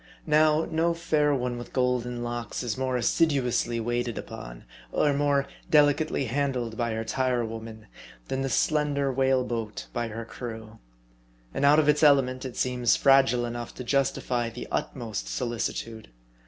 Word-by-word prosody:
Now, 155 0 +4
no 165 +1 0
fair 155 -3 +1
one 125 -2 -2
with 120 - -10
golden 125 -1 0
locks 120 0 -4
is 120 -3 -2
more 130 -1 -1
assiduously 125 -3 +1
waited 120 0 -2
upon, - - -8 0.3
or 145 - +2
more 140 -1 +2 0.2
delicately 150 -2 +3
handled 125 -2 -1
by 115 0 -1
her 110 0 -2
tire 125 0 0
women, 110 -1 -8 0.4
than 135 - -2
the 135 - -1
slender 145 -1 +1
whale 130 0 +2
boat 115 -3 -4
by 120 -1 -2
her 115 +1 -6
crew. 110 -1 -8 0.7
And 140 - 0
out 145 +2 +6
of 155 -2 +3
its 150 0 +3
element, 135 -4 +4
it 130 - -7
seems 125 -2 +2
fragile 135 -3 +4
enough 120 0 -6
to 125 - -6
justify 125 -2 0
the 120 +2 -8
utmost 115 -5 -3
solici 120 -2 -2
tude. 110 - -8
125 Hz, 155 wpm, -27 LUFS, 120-140 Hz, 0.7 s, out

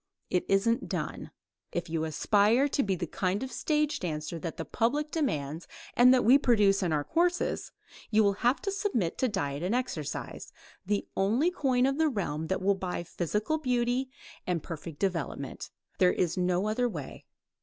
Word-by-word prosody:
"It 180 - +1
isn't 215 +4 +2
done." - - -4 0.4
If 175 - -3
you 160 -1 -1
aspire 210 - +3
to 280 - 0
be 195 -5 0
the 175 - -3
kind 185 +6 -1
of 260 - -5
stage 300 -1 0
dancer 155 -1 -4
that 165 0 -5
the 165 - -4
public 290 +7 0
demands 160 - -2 0.3
and 250 +1 +7
that 255 -3 +4
we 260 +5 +7
produce 210 -7 +4
in 180 -3 0
our 150 -2 +1
courses, 350 - 0 0.4
you 215 0 +4
will 200 -1 +3
have 245 +3 +3
to 395 - -1
submit 385 - -1
to 260 - +3
diet 145 - -2
and 185 +7 0
exercise, 175 - -4 0.3
the 205 +1 -1
only 235 - +2
coin 260 -7 +2
of 275 +2 0
the 320 -1 +4
realm 160 - -3
that 190 +2 -2
will 200 +1 +4
buy 185 -2 -4
physical 210 - -2
beauty 250 -1 0 0.4
and 175 -4 -1
perfect 165 -1 -7
development. 165 -7 -3 0.3
There 180 -1 +5
is 175 -3 0
no 180 +2 +1
other 245 +3 +1
way. - - -8
205 Hz, 175 wpm, -29 LUFS, 175-255 Hz, 0.4 s, and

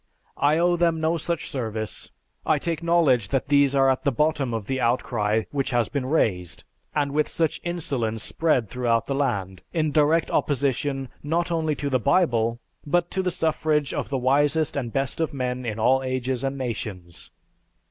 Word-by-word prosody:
I 145 +2 +3
owe 175 +1 +3
them 165 -1 +2
no 160 +1 +1
such 165 0 -3
service. 110 -5 -4 0.3
I 155 - +2
take 165 +2 -2
knowledge 165 - +3
that 135 +4 -1
these 140 -1 +4
are 135 -1 +4
at 130 -1 +1
the 140 - +2
bottom 150 0 0
of 110 -3 -3
the 130 +3 -2
outcry 110 -3 +1
which 140 -2 -1
has 120 -3 +1
been 135 -3 -2
raised, 95 - 0 0.3
and 145 -2 +1
with 150 +1 +1
such 165 -2 -1
insolence 130 -11 -2
spread 155 -9 +1
through 120 0 +1
the 135 - -2
land, 100 -10 -1
in 155 -2 +1
direct 155 +2 +3
opposition, 135 -1 0
not 170 +4 -1
only 160 -2 0
to 145 - -3
the 130 -2 +1
Bible, 120 - +2 0.2
but 175 +4 0
to 190 - 0
the 185 - 0
suffrage 155 -3 0
of - - -3
the 140 - -1
wisest 145 +4 +2
and 125 -5 -3
best 135 +3 -2
of 160 -2 -1
men 125 -1 -3
in 110 -1 -3
all 130 +4 +3
ages 130 -1 -2
and 135 0 -2
nations. 100 -8 -6
135 Hz, 180 wpm, -24 LUFS, 120-155 Hz, 0.3 s, these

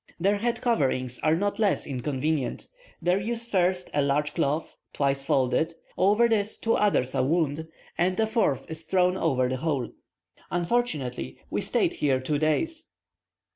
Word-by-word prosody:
Their 200 +4 +2
head 235 +3 -1
coverings 130 - 0
are 155 +1 +2
not 205 +5 -1
less 205 -4 +2
inconvenient: 140 +1 -2 0.4
they 180 +3 +2
use 235 +2 -1
first 185 -4 +1
a 145 - +2
large 145 +1 +1
cloth, 150 +3 -1 0.2
twice 135 -1 0
folded; 140 +5 +1 0.2
over 210 +5 +4
this 215 -2 +2
two 230 - 0
others 130 -11 +2
are - - +1
wound, 160 +1 0 0.3
and 185 +3 +1
a 220 - +4
fourth 215 - 0
is 160 0 -7
thrown 180 +1 +2
over 130 -8 +1
the 130 +1 -2
whole. 140 -4 -1 0.6
Unfortunately, 155 - -1
we - - 0
stayed - - +1
here 135 -3 +1
two 145 +3 -1
days. 315 - -1
160 Hz, 155 wpm, -26 LUFS, 140-200 Hz, 0.6 s, over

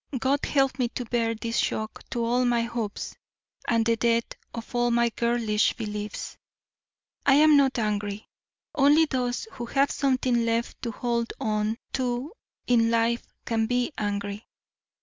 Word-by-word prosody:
God 270 +3 +1
help 270 -2 +1
me 245 - +2
to 245 +1 -5
bear 230 -1 0
this 230 +1 -3
shock 215 0 -2
to 235 -1 -1
all 245 +2 +2
my 240 -1 +2
hopes 230 -3 -4 0.5
and 230 -1 +2
the 230 0 +3
death 230 0 +2 0.3
of 230 +1 -8
all 240 0 +2
my 235 0 +3
girlish 230 -2 +1
beliefs. 210 -2 -5 0.9
I 275 - +5
am 305 +1 +6
not 275 -2 +4
angry. 210 -2 -2 0.5
Only 295 +3 +5
those 250 - -2
who 240 -1 -6
have 275 +3 +2
something 255 -3 +1
left 230 +1 -1
to 235 - -3
hold 235 0 -2
on 215 +1 0 0.2
to 255 - -2 0.3
in 230 -2 +3
life 230 +1 +1 0.2
can 225 -1 0
be 245 +4 0
angry. 205 0 -3
235 Hz, 150 wpm, -26 LUFS, 225-250 Hz, 0.9 s, am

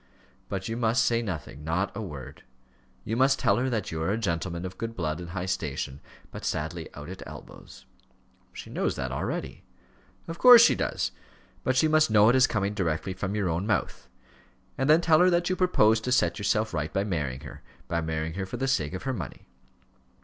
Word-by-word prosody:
"But 95 -1 -3
you 115 - -3
must 115 +2 +2
say 115 0 +2
nothing 80 -8 -6
not 85 +5 -1
a - - -4
word; 75 -10 -8 0.6
you 110 - -3
must 135 +2 +3
tell - - +2
her 130 +2 0
that 110 -6 -2
you 80 -1 -3
are 80 - 0
a 105 - +1
gentleman 85 -3 -2
of 95 - -8
good 115 0 -4
blood 80 -4 -2
and 85 -1 -7
high 90 +1 -4
station, 75 -7 -3 0.3
but - - -8
sadly 80 +2 -3
out 75 0 -8
at 95 +1 -8
elbows." - - -12 0.7
"She - - -10
knows - - -1
that - - -4
already." - - -4 0.6
"Of 165 0 -6
course 245 -2 +10
she - - +6
does; - - -2 0.5
but 130 - +1
she 155 - +4
must 155 -2 +4
know 105 0 +6
it 125 - +4
as 130 0 +5
coming 100 -1 -1
directly 95 -1 -2
from 95 +2 -4
your 100 -3 0
own 85 +5 -2
mouth. 105 - -2 0.7
And 135 +2 -1
then 155 +2 +6
tell 160 -2 +4
her 180 - +6
that 175 +1 +1
you - - +1
propose 115 - +3
to 125 - -3
set 90 -9 +2
yourself 110 +1 0
right 75 -1 -2
by 95 - 0
marrying 75 -10 -3
her - - -10 0.3
by 85 0 -1
marrying 80 0 -3
her 95 +1 -4
for - - -6
the 135 - -1
sake 80 - 0
of 95 - -6
her 135 - -1
money." 100 - -7
100 Hz, 210 wpm, -27 LUFS, 85-120 Hz, 0.7 s, course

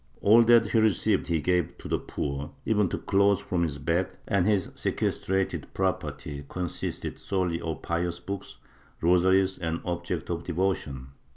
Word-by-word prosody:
All 110 +4 +6
that 115 -2 +5
he 115 - +4
received 110 -5 +2
he 85 -1 +1
gave 90 +2 0
to - - -9
the - - 0
poor, 70 +1 -4 0.2
even 105 -4 +2
to - - -2
clothes 100 0 +3
from 90 -2 -2
his 75 -4 -1
back, 85 +6 0 0.2
and 95 -2 +2
his 100 -4 +1
sequestrated 95 0 -1
property 80 -6 -2
con 90 -1 -2
sisted 85 - -5
solely 90 -4 -1
of 80 -1 -4
pious 85 0 -1
books, 100 +2 -6 0.4
rosaries 95 +2 +3
and 80 -1 -2
objects 85 -1 -3
of 85 -1 -3
devotion. 80 -8 -2
90 Hz, 160 wpm, -27 LUFS, 85-95 Hz, 0.4 s, All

